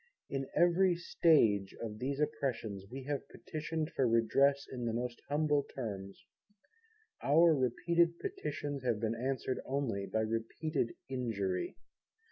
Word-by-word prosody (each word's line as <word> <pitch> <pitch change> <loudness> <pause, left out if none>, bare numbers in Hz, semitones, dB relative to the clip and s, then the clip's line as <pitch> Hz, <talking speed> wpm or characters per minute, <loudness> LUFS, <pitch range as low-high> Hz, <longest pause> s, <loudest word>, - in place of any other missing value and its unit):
In 135 -1 -2
every 175 +1 +4
stage 115 - +3
of 110 -2 -5
these 135 +2 -2
Oppressions 135 -10 -2
We 135 +2 -6
have 145 +1 -3
Petitioned 155 0 -4
for 130 - +2
Redress 135 +5 +3
in 125 -2 -5
the 115 - 0
most 120 +1 -3
humble 150 0 +2
terms: 100 -8 -7 1.0
Our 165 +4 +6
repeated 170 +7 +2
Petitions 170 - -4
have 120 -4 0
been 110 0 0
answered 130 +2 -2
only 125 -8 -2
by 110 - 0
repeated 115 +5 -2
injury. 105 -8 -2
135 Hz, 125 wpm, -33 LUFS, 115-150 Hz, 1.0 s, Our